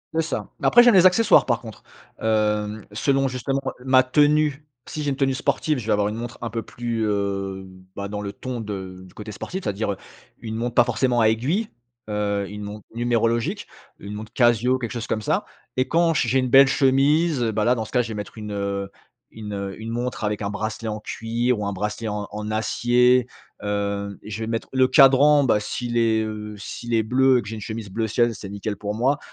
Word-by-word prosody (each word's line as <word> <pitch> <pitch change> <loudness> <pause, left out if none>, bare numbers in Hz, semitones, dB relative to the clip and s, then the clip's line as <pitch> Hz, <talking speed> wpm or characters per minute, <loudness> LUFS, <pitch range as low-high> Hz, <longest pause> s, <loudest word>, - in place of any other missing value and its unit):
C'est 165 - +3
ça. 165 - -4
Mais - - +1
après, 240 - +7
j'aime 240 -1 +6
les 185 -2 +6
accessoires, 215 +4 +4
par 120 -2 +1
contre. 110 -3 -11 0.4
Hem, 105 -1 0
selon, 135 +5 +1
justement, 135 +2 -2 0.2
ma 130 0 +5
tenue. 150 +2 +2 0.2
Si 155 - -6
j'ai 145 - -1
une 135 - -1
tenue 135 -1 +1
sportive, 150 +3 0
je 110 - -8
vais - - +3
avoir 105 0 +1
une 105 - -5
montre 120 +1 -6
un 120 - -3
peu 115 +1 -3
plus, 115 0 -4
heu, 100 -2 -2 0.3
bah, 100 0 -5
dans 105 0 -4
le 100 -1 -5
ton 130 -2 -5
de 95 -4 -6
du 90 - -19
côté 105 0 -8
sportif, 185 - -6
ça - - -1
veut - - -10
dire, 100 0 -1
heu, - - -10 0.4
une 110 -1 -5
montre 120 +1 -3
pas - - +7
forcément 120 0 +1
à 110 - +5
aiguilles, 150 - 0 0.4
heu, 100 -1 -1
une 105 0 -7
montre 105 0 -8
numérologique, 115 -1 0 0.3
une 100 +1 -8
montre 105 +1 -8
Casio, 120 +1 +3
quelque 120 -3 -5
chose 120 -2 -5
comme 110 - -1
ça. - - 0 0.3
Et 130 - +2
quand 165 0 +3
j 135 - +1
j'ai 130 +3 +2
une 130 -1 0
belle 135 +2 +8
chemise, 140 +3 +3
et 115 - 0
bah, 105 - 0
là 120 +3 +3
dans 110 -2 -3
ce 110 - -12
cas-là 125 -1 +3
je 115 - -7
vais - - -4
mettre 105 +1 -7
une, 105 -1 -6
heu 100 -1 -3 0.4
une, 105 -2 -7
heu 100 0 -5
une 110 - -5
montre 120 -1 -3
avec 105 0 -2
un 100 - -2
bracelet 110 +2 -4
en 105 0 -4
cuir, 115 +3 -1
ou - - -2
un 100 - -1
bracelet 105 +3 -3
en 105 0 -4
en 105 0 -5
acier. 120 +3 +3 0.4
Hem, 100 -1 -2
je 110 +1 -7
vais - - -4
mettre, 115 0 -3
le 130 -1 +3
cadran, 140 +1 +6
bah 105 -4 +2
s'il 120 +3 -4
est, 110 -1 +2
heu 105 -1 -6
s'il 120 +3 -6
est 110 -1 +3
bleu 130 +3 +4
et - - +1
que 100 - -11
j'ai 110 - -5
une 110 - -8
chemise 110 0 -6
bleu 110 +4 -2
ciel, 120 +1 +1
c'est 100 0 -8
nickel 100 +1 -4
pour 105 +1 -4
moi. 130 +6 +2
115 Hz, 235 wpm, -23 LUFS, 105-130 Hz, 0.4 s, belle